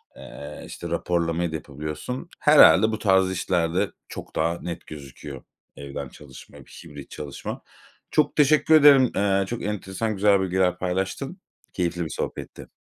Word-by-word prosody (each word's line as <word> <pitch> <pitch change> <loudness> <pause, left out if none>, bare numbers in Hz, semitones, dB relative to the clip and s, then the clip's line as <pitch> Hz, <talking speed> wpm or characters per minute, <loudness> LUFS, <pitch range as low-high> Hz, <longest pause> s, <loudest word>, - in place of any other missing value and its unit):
Eee, 75 +1 -10
işte - - -8
raporlamayı 85 -1 -1
da - - -4
yapabiliyorsun. 75 - -6
Herhâlde 110 - +7
bu 110 - -3
tarz 95 -2 +3
işlerde 90 -1 0 0.2
çok - - -10
daha 85 +2 0
net 85 -1 -7
gözüküyor 70 -2 -10 0.3
evden 70 -1 -7
çalışma, 65 -1 -14
hibrit 75 -2 -12
çalışma. 75 -2 -7 0.5
Çok 150 -1 +2
teşekkür 155 +2 +4
ederim. 140 -4 +7
Iıı, 100 0 +1
çok 120 +4 -5
enteresan 105 +1 -3
güzel 100 0 +3
bilgiler 95 -1 +1
paylaştın. 95 +1 -3 0.3
Keyifli 85 -1 -2
bir 80 - -6
sohbetti. - - -6
90 Hz, 135 wpm, -24 LUFS, 80-105 Hz, 0.5 s, Herhâlde